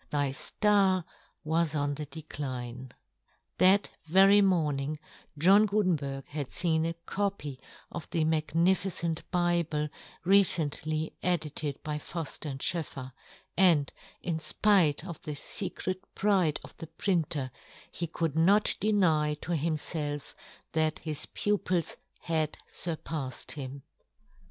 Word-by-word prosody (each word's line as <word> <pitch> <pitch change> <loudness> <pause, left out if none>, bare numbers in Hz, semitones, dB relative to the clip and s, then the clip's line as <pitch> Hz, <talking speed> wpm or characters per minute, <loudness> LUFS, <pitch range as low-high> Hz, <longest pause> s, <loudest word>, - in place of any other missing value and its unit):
Thy 145 -2 +1
ftarwas 170 -3 0
on 145 -1 0
the 150 +1 -5
decline. 130 -4 -6 0.7
That 195 +2 +5 0.2
very 195 +4 +6
morning 155 -6 +1 0.4
John 195 +7 +6
Guten 200 -3 +2
berg 135 -2 -5
had 145 -3 -5
feen 165 -1 +1
a 165 - -5
copy 195 -10 -3 0.3
of 170 - -7
the 165 - +1
magni 160 +3 +3
ficent 170 -4 -2
Bible 170 -4 +1 0.4
recently 160 -5 +2
edited 155 -5 -1
by 150 -1 -3
Fuft 160 -1 -5
and 135 -1 -5
SchoefFer, 140 -5 -1 0.4
and, 170 -6 +4 0.3
in 165 -3 -1
fpite 165 -1 +2
of 170 -4 -7
the 150 - -5
fecret 185 +3 -2
pride 190 -7 +2
of - - -12
the 165 - -8
printer, 160 -5 -1 0.4
he 170 - -3
could 160 -2 -2
not 195 +6 +4
deny 165 -8 +2
to 160 - -7
himfelf 155 -2 -2 0.4
that 155 -1 +1
his 155 -2 -3
pupils 185 -5 -1 0.2
had 160 -2 -1
furpafled 155 -5 -3
him. 140 -1 -4
160 Hz, 120 wpm, -29 LUFS, 150-180 Hz, 0.7 s, very